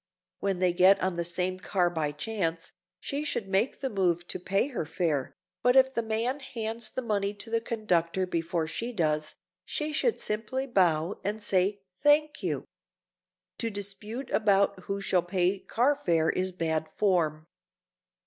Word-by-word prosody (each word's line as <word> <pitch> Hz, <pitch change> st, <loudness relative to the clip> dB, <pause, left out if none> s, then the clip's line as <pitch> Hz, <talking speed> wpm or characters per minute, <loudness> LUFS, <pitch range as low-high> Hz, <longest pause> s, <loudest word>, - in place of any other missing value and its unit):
When 195 Hz, -2 st, 0 dB
they 180 Hz, -1 st, +2 dB
get 190 Hz, +3 st, +6 dB
on 185 Hz, -2 st, 0 dB
the 170 Hz, -, -1 dB
same 180 Hz, +2 st, -1 dB
car 185 Hz, -2 st, +1 dB
by 160 Hz, -4 st, -1 dB
chance, 165 Hz, 0 st, -2 dB, 0.3 s
she 285 Hz, +2 st, -3 dB
should 285 Hz, -8 st, -1 dB
make 195 Hz, +8 st, 0 dB
the 265 Hz, -, -1 dB
move 175 Hz, -4 st, +1 dB
to -, -, -1 dB
pay 195 Hz, +8 st, 0 dB
her 245 Hz, -, -2 dB
fare, 155 Hz, -3 st, -1 dB, 0.3 s
but 245 Hz, +1 st, +4 dB
if 265 Hz, 0 st, +6 dB
the 235 Hz, -, 0 dB
man 230 Hz, +5 st, -1 dB
hands 230 Hz, -4 st, -3 dB
the 255 Hz, -, -4 dB
money 205 Hz, -2 st, 0 dB
to 225 Hz, +2 st, -6 dB
the 230 Hz, 0 st, +1 dB
conductor 190 Hz, -6 st, 0 dB
before 170 Hz, -1 st, -1 dB
she 230 Hz, +10 st, -4 dB
does 155 Hz, -7 st, 0 dB
so, -, -, -9 dB, 0.3 s
she 305 Hz, 0 st, -3 dB
should 455 Hz, +9 st, +1 dB
simply 220 Hz, +5 st, -2 dB
bow 180 Hz, -, +2 dB
and 210 Hz, +2 st, -3 dB
say 195 Hz, +1 st, +2 dB, 0.2 s
"Thank 295 Hz, +1 st, +3 dB
you!" -, -, -2 dB, 0.9 s
To 230 Hz, -, -1 dB
dispute 210 Hz, +5 st, -5 dB
about 200 Hz, -3 st, +3 dB
who 200 Hz, 0 st, -3 dB
shall 185 Hz, -2 st, +2 dB
pay 180 Hz, +2 st, +1 dB
car 250 Hz, +9 st, +1 dB
fare 165 Hz, -, +2 dB
is 185 Hz, 0 st, -1 dB
bad 160 Hz, -3 st, -1 dB
form. 160 Hz, -6 st, +1 dB
195 Hz, 165 wpm, -28 LUFS, 175-230 Hz, 0.9 s, get